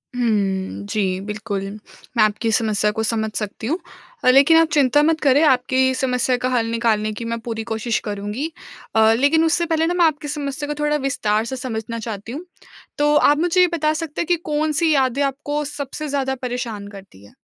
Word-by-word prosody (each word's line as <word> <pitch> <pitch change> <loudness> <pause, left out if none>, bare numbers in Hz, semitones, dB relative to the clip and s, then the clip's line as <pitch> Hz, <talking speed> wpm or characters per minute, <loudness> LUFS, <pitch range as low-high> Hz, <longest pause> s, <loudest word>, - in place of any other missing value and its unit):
हुँ। 200 -5 -1
जी, 190 -4 0
बिल्कुल। 210 -1 -4 0.6
मैं 215 - +6
आपकी 215 +2 0
समस्या 210 -2 +1
को 220 +1 -3
समझ 220 -1 -1
सकती 215 +1 -4
हूँ। 325 +6 0 0.5
अ, 255 - +5
लेकिन 280 +5 +6
आप 330 -1 +5
चिंता 290 0 +4
मत 320 0 +2
करें 280 +1 +4
आपकी 260 -1 +3
समस्या 255 -1 +1
का 255 +1 -1
हल 240 -3 +1
निकालने 220 -2 +1
की 230 - -6
मैं 230 0 -3
पूरी 225 -1 -3
कोशिश 220 +1 -1
करुँगी। 210 +10 -4 0.4
अ, - - +4 0.2
लेकिन 320 +4 +3
उससे 340 +1 +1
पहले 320 -1 +1
ना 350 - 0
मैं 350 -2 +3
आपकी 295 -1 0
समस्या 290 0 -4
को 295 - -2
थोड़ा 295 0 +2
विस्तार 215 -5 0
से 265 - -4
समझना 230 -2 -5
चाहती 220 0 -6
हूँ। 315 +7 -6 0.5
तो 295 0 +3
आप 295 0 +5
मुझे 355 +2 +3
ये 360 - +6
बता 310 -1 +1
सकते 300 -2 -4
हैं 335 - -3
कि 350 - +3 0.2
कौन-सी 310 +1 +1
यादें 265 0 +1
आपको 290 +2 -2
सबसे 290 +1 -5
ज़्यादा 270 -2 -1
परेशान 235 -5 -4
करतीं 195 - -13
हैं? 100 - -18
255 Hz, 195 wpm, -21 LUFS, 220-295 Hz, 0.6 s, मैं